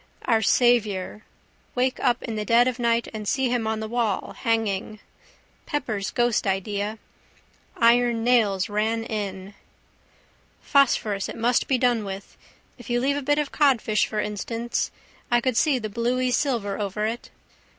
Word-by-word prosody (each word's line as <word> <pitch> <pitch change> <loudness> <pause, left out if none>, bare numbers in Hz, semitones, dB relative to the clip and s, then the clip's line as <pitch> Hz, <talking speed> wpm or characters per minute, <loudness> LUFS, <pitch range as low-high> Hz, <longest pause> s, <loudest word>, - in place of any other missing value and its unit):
Our 225 -2 +3
Saviour. 215 -4 +2 0.5
Wake 255 +1 0
up 245 -2 +1
in 225 - -4
the 210 - -2
dead 235 +3 +4
of 255 0 -2
night 235 -1 +1
and 215 -1 -6
see 265 +2 +1
him 235 -3 0
on 220 0 -1
the 220 - -4
wall, 230 -3 -1
hanging. 215 -2 -1 0.7
Pepper's 220 -9 -2
ghost 240 -3 +1
idea. 200 +2 -2 0.8
Iron 235 0 +3
Nails 215 -6 +3
Ran 220 +2 -1
In. 200 -3 -5 1.1
Phosphorus 225 -8 +2
it - - -7
must 235 +2 +1
be 265 - +2
done 245 -3 +2
with. 195 0 -7 0.4
If 245 - -11
you 240 0 +1
leave 275 +3 +1
a 290 - -2
bit 290 +2 +1
of 295 -2 -1
codfish 250 -7 +2
for 215 - -3
instance. 225 +3 -2 0.4
I 240 - +4
could 255 0 -1
see 285 +2 +3
the 220 -3 -4
bluey 245 +4 0
silver 235 -6 0
over 210 +1 -2
it. 230 +2 -4
230 Hz, 155 wpm, -24 LUFS, 210-245 Hz, 1.1 s, dead